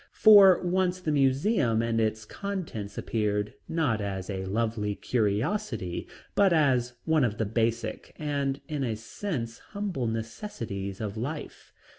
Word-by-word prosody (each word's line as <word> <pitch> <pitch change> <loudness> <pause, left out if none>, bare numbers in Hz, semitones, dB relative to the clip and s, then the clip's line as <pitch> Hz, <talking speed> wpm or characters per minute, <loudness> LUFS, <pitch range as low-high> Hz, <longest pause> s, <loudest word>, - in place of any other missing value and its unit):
For 200 -4 +8
once 180 0 +1
the 160 -4 -1
museum 135 - +2
and 115 -1 +1
its 110 0 -1
contents 160 - -5
appeared, 105 -2 -1 0.2
not 145 -10 +1
as 95 -1 -3
a 95 -1 -3
lovely 105 0 -1
curiosity, 110 - -1 0.3
but 200 -2 +4
as 130 -7 +3
one 160 -3 +3
of 110 -3 0
the 110 - 0
basic, 115 +1 -1
and 140 -2 -1
in 150 -3 -2
a 115 -4 -1
sense 115 - -5
humble 200 - -3
necessities 110 - -4
of 105 0 -4
life. 145 +7 -6
115 Hz, 135 wpm, -28 LUFS, 110-160 Hz, 0.3 s, For